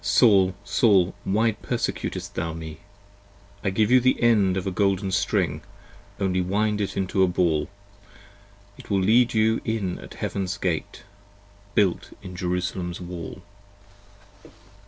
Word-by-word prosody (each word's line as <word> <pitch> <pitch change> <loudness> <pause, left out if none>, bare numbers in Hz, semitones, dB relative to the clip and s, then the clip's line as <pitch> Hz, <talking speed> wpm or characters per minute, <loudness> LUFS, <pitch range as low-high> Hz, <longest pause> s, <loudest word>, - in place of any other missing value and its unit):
" - - -26 0.2
Saul, 95 -6 +5
Saul, 95 -7 +3
Why 110 +4 +2
persecutest 105 - -4
thou 80 0 -3
me? 80 -1 -8 0.4
" 100 0 -28
I 100 - +1
give 105 +4 +1
you 130 - +7
the 130 +1 +2
end 105 -6 +3
of 95 - -3
a 95 - -1
golden 95 +1 0
string, 95 - 0 0.6
Only 95 -2 +1
wind 105 +3 0
it 100 - -3
into 95 0 0
a 95 - +5
ball: 85 -3 +1 1.1
It - - -13
will 100 -2 +2
lead 115 +5 +3
you 110 +1 +2
in 105 -6 -2
at - - -11
Heaven's 95 -2 -3
gate, - - -3 0.7
Built 95 -4 +1
in 90 -2 -8
Jerusalem's 90 -1 -3
wall. 90 0 -7
95 Hz, 140 wpm, -24 LUFS, 90-105 Hz, 1.1 s, you